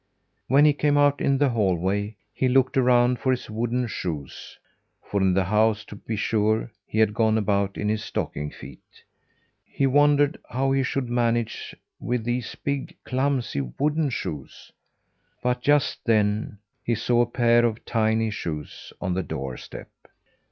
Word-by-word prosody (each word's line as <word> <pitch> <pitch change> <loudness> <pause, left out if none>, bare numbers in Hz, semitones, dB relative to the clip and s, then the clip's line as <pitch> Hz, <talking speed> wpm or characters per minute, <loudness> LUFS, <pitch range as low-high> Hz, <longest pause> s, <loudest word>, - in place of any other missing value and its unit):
When 140 +4 +5
he 150 - +5
came 145 0 +1
out 145 0 +3
in 140 -1 +2
the 145 0 +3
hallway, 100 -1 0 0.2
he 130 - 0
looked 130 0 +3
around 125 -1 +3
for 130 - -1
his 125 -3 -1
wooden 120 +3 -1
shoes; 80 - -6 0.5
for 100 - -2
in 95 -1 +3
the 95 - +3
house, 105 +2 +2
to - - -10
be 110 +2 -5
sure, 110 +2 0 0.2
he - - -5
had 110 -1 +3
gone 110 0 +2
about 100 -2 0
in 105 - -2
his 105 0 -1
stocking 75 +1 -3
feet. 65 -1 -14 0.6
He 135 - -1
wondered 145 +2 +3
how 135 +2 0
he 135 0 +2
should 130 0 -1
manage 120 -1 -1 0.2
with 120 -1 -2
these 120 0 -3
big, 140 -1 -4
clumsy 130 - -1 0.2
wooden 150 0 +1
shoes; 80 - -6 0.7
but 125 0 0
just 145 +1 +2
then, 105 -2 +1 0.3
he 120 - 0
saw 120 +2 +2
a 120 - +2
pair 120 -1 +3
of 115 -1 -1
tiny 110 0 +1
shoes 75 -7 -6
on 90 - -2
the 95 - 0
doorstep. 65 -6 -7
115 Hz, 160 wpm, -25 LUFS, 105-130 Hz, 0.7 s, When